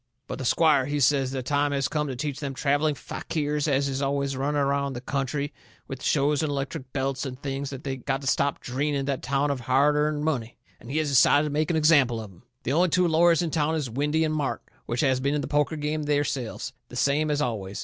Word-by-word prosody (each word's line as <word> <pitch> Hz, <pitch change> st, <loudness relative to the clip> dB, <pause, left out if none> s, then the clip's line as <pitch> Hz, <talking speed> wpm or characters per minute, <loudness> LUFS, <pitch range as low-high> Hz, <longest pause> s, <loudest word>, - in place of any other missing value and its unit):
But, -, -, -6 dB
the 130 Hz, -, -4 dB
squire, 145 Hz, -1 st, +3 dB
he 145 Hz, 0 st, -1 dB
says 135 Hz, 0 st, +3 dB
the 130 Hz, -1 st, -4 dB
time 145 Hz, +2 st, +1 dB
has 135 Hz, -1 st, +1 dB
come 150 Hz, -1 st, -1 dB
to 130 Hz, -, -4 dB
teach 145 Hz, +1 st, -3 dB
them 140 Hz, -2 st, -4 dB
travelling 145 Hz, +2 st, +1 dB
fakirs 150 Hz, +1 st, -3 dB
as 140 Hz, -1 st, +2 dB
is 135 Hz, 0 st, -2 dB
always 140 Hz, 0 st, -1 dB
running 145 Hz, +2 st, 0 dB
around 140 Hz, 0 st, 0 dB
the 120 Hz, -, -5 dB
country 140 Hz, +2 st, -2 dB, 0.3 s
with 135 Hz, -1 st, -7 dB
shows 145 Hz, 0 st, +2 dB
and 155 Hz, -, -1 dB
electric 135 Hz, -1 st, -4 dB
belts 135 Hz, -1 st, -2 dB
and 130 Hz, -2 st, -6 dB
things 140 Hz, 0 st, -4 dB
that 135 Hz, -1 st, -8 dB
they 135 Hz, -1 st, -3 dB
got 135 Hz, +1 st, -2 dB
to -, -, -8 dB
stop 140 Hz, +1 st, 0 dB
dreening 140 Hz, +2 st, -1 dB
that 140 Hz, -2 st, -2 dB
town 140 Hz, +2 st, 0 dB
of 140 Hz, -, -2 dB
hard 135 Hz, +4 st, +3 dB
earned 150 Hz, 0 st, 0 dB
money, 125 Hz, -7 st, -2 dB, 0.2 s
and 120 Hz, -, -13 dB
he 145 Hz, -, -2 dB
has 155 Hz, -2 st, +1 dB
decided 140 Hz, +2 st, +5 dB
to -, -, -5 dB
make 155 Hz, +1 st, 0 dB
an 165 Hz, -, +1 dB
example 145 Hz, -7 st, +4 dB
of 110 Hz, -3 st, -8 dB
'em. 85 Hz, -, -19 dB, 0.2 s
The 135 Hz, -, -1 dB
only 175 Hz, +3 st, +3 dB
two 180 Hz, +2 st, +3 dB
lawyers 170 Hz, +1 st, +4 dB
in 165 Hz, -, -2 dB
town 155 Hz, 0 st, +1 dB
is 145 Hz, -7 st, -3 dB
Windy 150 Hz, +6 st, +1 dB
and 155 Hz, -1 st, 0 dB
Mart, 150 Hz, -3 st, -2 dB, 0.2 s
which 120 Hz, -, -1 dB
has 130 Hz, -2 st, +2 dB
been 140 Hz, +2 st, 0 dB
in 150 Hz, -, 0 dB
the -, -, -4 dB
poker 150 Hz, +2 st, +1 dB
game 150 Hz, +1 st, -2 dB
theirselves, 145 Hz, -5 st, -2 dB, 0.2 s
the -, -, -10 dB
same 150 Hz, +2 st, +1 dB
as 145 Hz, -1 st, +1 dB
always. 105 Hz, -8 st, -3 dB
140 Hz, 240 wpm, -26 LUFS, 135-150 Hz, 0.3 s, decided